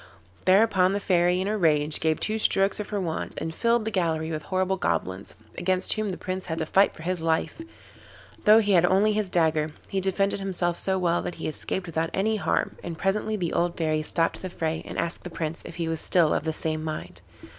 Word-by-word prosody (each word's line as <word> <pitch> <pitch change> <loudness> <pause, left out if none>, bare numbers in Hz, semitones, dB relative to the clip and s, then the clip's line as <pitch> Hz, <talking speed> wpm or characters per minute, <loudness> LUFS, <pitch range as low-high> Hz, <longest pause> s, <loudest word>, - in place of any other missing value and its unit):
Thereupon 190 -1 +4
the 200 - 0
Fairy, 180 -2 +2
in 190 - -2
a 215 - 0
rage, 155 -5 +2
gave 160 0 +1
two 220 +1 -1
strokes 195 -1 +3
of 210 - -5
her 205 - -2
wand 165 -4 -3
and 160 - -4
filled 230 +3 +1
the 220 - -2
gallery 165 -4 -1
with 155 -1 -3
horrible 185 +3 0
goblins, 95 - -2 0.2
against 185 +1 +1
whom 215 -1 -2
the 185 - -4
Prince 185 0 -4
had 160 -1 -3
to 160 - -1
fight 195 +5 +3
for 160 - -11
his 180 0 -2
life. 160 - -1 0.8
Though 215 0 +8
he 205 -1 0
had 175 -3 +5
only 195 +4 +3
his 210 -2 -1
dagger, 160 -3 +1 0.2
he 195 - -1
defended 195 +1 +1
himself 175 -3 -1
so 190 0 0
well 175 -2 +1
that 175 - -5
he - - -5
escaped 180 +4 -3
without 165 -1 -2
any 215 +3 +1
harm, - - -1
and 170 -2 -5
presently 210 +4 0
the 175 -5 -2
old 175 0 0
Fairy 155 -2 0
stopped 165 +2 -1
the 185 - -5
fray 160 -2 -2
and - - -7
asked 170 0 -3
the 180 - -6
Prince 165 -1 -4
if - - -9
he 170 -2 -2
was 165 -1 -2
still 170 -4 +3
of - - -1
the 160 - 0
same 155 0 -2
mind. 155 -1 -6
180 Hz, 225 wpm, -26 LUFS, 160-195 Hz, 0.8 s, Though